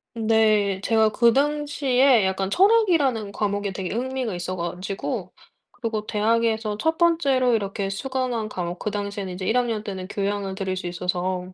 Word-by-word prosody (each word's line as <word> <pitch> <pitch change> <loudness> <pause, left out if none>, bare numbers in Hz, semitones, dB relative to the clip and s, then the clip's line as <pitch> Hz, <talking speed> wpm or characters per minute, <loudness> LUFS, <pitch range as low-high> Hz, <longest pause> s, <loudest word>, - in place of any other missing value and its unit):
네. 215 -3 +2
제가 220 0 +3
그 235 +2 +4
당시에 275 -4 +2
약간 190 0 -1
철학이라는 330 - +3
과목에 205 -1 -1
되게 190 -1 -4
흥미가 255 -1 -2
있어 180 +1 -4
가지고 180 +3 -4 0.4
그리고 220 -3 -4
대학에서 220 0 +1
1 320 +4 0
번째로 280 -8 +3
이렇게 200 -2 -1
수강한 250 0 -2
과목 175 -2 -4
그 - - -2
당시에는 200 -2 -4
인제 185 +1 -5
1 220 +5 +2
학년 230 -4 0
때는 190 -3 -6
교양을 200 -1 -2
들을 190 -1 -2
수 185 -1 -5
있어서 180 +1 -3
215 Hz, 340 characters per minute, -24 LUFS, 195-250 Hz, 0.4 s, 그